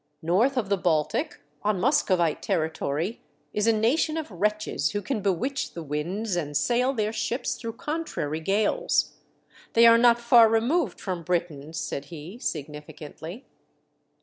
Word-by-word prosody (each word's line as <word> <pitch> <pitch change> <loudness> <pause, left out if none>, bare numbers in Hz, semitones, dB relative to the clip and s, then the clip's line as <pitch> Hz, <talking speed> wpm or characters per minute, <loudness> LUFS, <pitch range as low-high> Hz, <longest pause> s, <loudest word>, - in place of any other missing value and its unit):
North 220 +12 +2
of 215 -6 -1
the 200 - +2
Baltic, 160 -4 0 0.2
on 210 -2 0
Muskovite 185 - +2
territory, 160 +4 -2 0.3
is 210 +1 0
a - - +6
nation 255 +9 +1
of 310 -7 -5
wretches 210 +4 -1
who 205 - -1
can 250 -7 -2
bewitch 205 +9 -1
the 170 - -6
winds 175 +8 -2
and 150 -4 -1
sail 250 - +2
their 215 -4 -1
ships 230 +3 -2
through 230 -2 -6
contrary 255 - -3
gales. 215 - +1 0.6
They 230 0 +6
are 230 0 +8
not 235 0 +6
far 235 -1 +6
removed 240 +10 +1
from 185 -3 -4
Britain," 165 -4 -2
said 145 -3 -4
he, 165 +8 -9
significantly. 155 - -6
205 Hz, 145 wpm, -26 LUFS, 160-235 Hz, 0.6 s, are